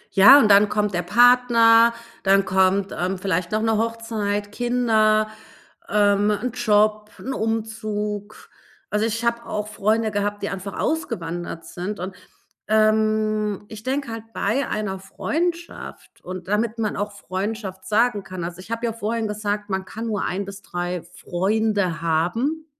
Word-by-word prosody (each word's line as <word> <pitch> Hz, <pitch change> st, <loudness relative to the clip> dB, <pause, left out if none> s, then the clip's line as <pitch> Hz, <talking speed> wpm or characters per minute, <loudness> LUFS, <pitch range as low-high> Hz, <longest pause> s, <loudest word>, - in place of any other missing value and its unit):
Ja, 210 Hz, +8 st, +10 dB
und 235 Hz, -, +5 dB
dann 205 Hz, +1 st, +6 dB
kommt 210 Hz, -1 st, 0 dB
der 175 Hz, -, 0 dB
Partner, 235 Hz, +2 st, +5 dB, 0.3 s
dann 195 Hz, 0 st, +3 dB
kommt, 190 Hz, +1 st, +2 dB
ähm, 185 Hz, +2 st, -1 dB
vielleicht 180 Hz, -2 st, -1 dB
noch 215 Hz, +1 st, 0 dB
'ne 225 Hz, -1 st, +2 dB
Hochzeit, 220 Hz, -3 st, -2 dB
Kinder, 220 Hz, -3 st, +2 dB, 0.6 s
ähm, 205 Hz, 0 st, +3 dB
'n 225 Hz, +4 st, -1 dB
Job, 215 Hz, -3 st, +2 dB
'n 265 Hz, -, -5 dB
Umzug. 215 Hz, -2 st, -3 dB, 0.4 s
Also, 210 Hz, +1 st, +1 dB
ich 230 Hz, +1 st, -3 dB
habe 235 Hz, 0 st, 0 dB
auch 210 Hz, 0 st, -3 dB
Freunde 215 Hz, +1 st, 0 dB
gehabt, 205 Hz, 0 st, -2 dB
die 200 Hz, -, -1 dB
einfach 195 Hz, +1 st, -6 dB
ausgewandert 175 Hz, -, -3 dB
sind 185 Hz, +3 st, -5 dB
und, 185 Hz, +1 st, -5 dB, 0.5 s
ähm, 215 Hz, -1 st, +1 dB
ich 215 Hz, -1 st, -9 dB
denke 265 Hz, +1 st, -2 dB
halt 225 Hz, 0 st, -8 dB
bei 250 Hz, +7 st, 0 dB
einer 195 Hz, -3 st, -3 dB
Freundschaft 340 Hz, -, -4 dB
und 185 Hz, 0 st, -7 dB
damit 215 Hz, +3 st, 0 dB
man 215 Hz, -2 st, -1 dB
auch 205 Hz, 0 st, -3 dB
Freundschaft 195 Hz, 0 st, -5 dB
sagen 215 Hz, -1 st, +2 dB
kann 185 Hz, -2 st, -7 dB
also, 170 Hz, +1 st, -6 dB
ich 185 Hz, -, -12 dB
habe 230 Hz, +1 st, -2 dB
ja 230 Hz, -, -1 dB
vorhin 225 Hz, 0 st, -2 dB
gesagt, 210 Hz, 0 st, -3 dB
man 190 Hz, 0 st, -1 dB
kann 225 Hz, +4 st, -7 dB
nur 215 Hz, -4 st, -2 dB
1 195 Hz, +2 st, -2 dB
bis 200 Hz, 0 st, -9 dB
3 175 Hz, -1 st, -4 dB
Freunde 185 Hz, 0 st, -1 dB
haben. 225 Hz, -, 0 dB
210 Hz, 155 wpm, -23 LUFS, 195-225 Hz, 0.6 s, Ja